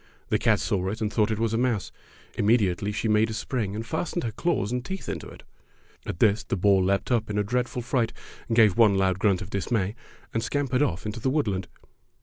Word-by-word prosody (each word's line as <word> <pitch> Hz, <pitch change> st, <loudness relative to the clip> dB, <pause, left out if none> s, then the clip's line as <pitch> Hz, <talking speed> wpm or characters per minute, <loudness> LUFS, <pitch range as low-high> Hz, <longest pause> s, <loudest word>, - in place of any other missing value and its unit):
The -, -, +2 dB
cat -, -, +3 dB
saw 95 Hz, -2 st, -1 dB
it 110 Hz, +3 st, -4 dB
and 110 Hz, -1 st, -2 dB
thought 105 Hz, -1 st, +2 dB
it 110 Hz, -, -1 dB
was 115 Hz, 0 st, 0 dB
a 115 Hz, -, +1 dB
mouse. 120 Hz, -6 st, 0 dB, 0.4 s
Immedi 105 Hz, -3 st, +3 dB
ately 100 Hz, +2 st, -3 dB
she 105 Hz, +2 st, -2 dB
made 110 Hz, +1 st, +3 dB
a 110 Hz, -, -4 dB
spring 105 Hz, -5 st, -2 dB
and 110 Hz, +1 st, -4 dB
fastened 170 Hz, +6 st, -2 dB
her 115 Hz, -, -2 dB
claws 110 Hz, -, -1 dB
and 125 Hz, 0 st, -2 dB
teeth 190 Hz, +7 st, -6 dB
into -, -, -4 dB
it. -, -, -13 dB, 0.6 s
At -, -, -4 dB
this 105 Hz, +3 st, +3 dB
the -, -, -2 dB
boar 95 Hz, +1 st, +4 dB
leaped 100 Hz, +5 st, 0 dB
up 115 Hz, -3 st, +1 dB
in 105 Hz, -, -2 dB
a 105 Hz, -, +2 dB
dreadful 125 Hz, +3 st, -2 dB
fright, 120 Hz, -2 st, 0 dB, 0.4 s
gave 110 Hz, -4 st, +5 dB
one 105 Hz, -4 st, +6 dB
loud 95 Hz, -1 st, +1 dB
grunt 100 Hz, -2 st, +2 dB
of 95 Hz, -, -11 dB
dismay, 100 Hz, 0 st, -1 dB, 0.4 s
and 115 Hz, -, 0 dB
scampered 135 Hz, 0 st, 0 dB
oflf 90 Hz, -, 0 dB
into 105 Hz, +2 st, -4 dB
the 130 Hz, -, 0 dB
woodland. 105 Hz, -, 0 dB
110 Hz, 225 wpm, -26 LUFS, 100-120 Hz, 0.6 s, one